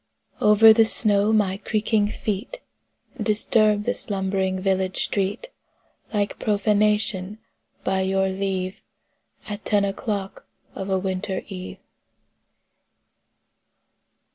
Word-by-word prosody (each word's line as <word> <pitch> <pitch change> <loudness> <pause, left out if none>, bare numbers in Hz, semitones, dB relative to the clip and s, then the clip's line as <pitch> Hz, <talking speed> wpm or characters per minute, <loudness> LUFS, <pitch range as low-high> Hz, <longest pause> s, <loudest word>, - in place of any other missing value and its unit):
Over 220 +1 +7
the 225 0 +4
snow 210 -1 +4
my 200 -3 +1
creaking 215 0 0
feet 210 - -4 0.6
Disturbed 215 -1 +2
the - - +1
slumbering 190 -1 -2
village 190 -1 0
street 205 - -2 0.6
Like 205 -2 -2
profanation, 210 -1 +1 0.5
by 190 0 0
your 190 0 +1
leave, 190 -1 -3 0.7
At 210 0 -6
ten 205 -2 +2
o'clock 200 -1 -4 0.3
of 190 - -6
a 190 - +1
winter 190 0 -3
eve. 185 -2 -7
200 Hz, 95 wpm, -23 LUFS, 190-210 Hz, 0.7 s, Over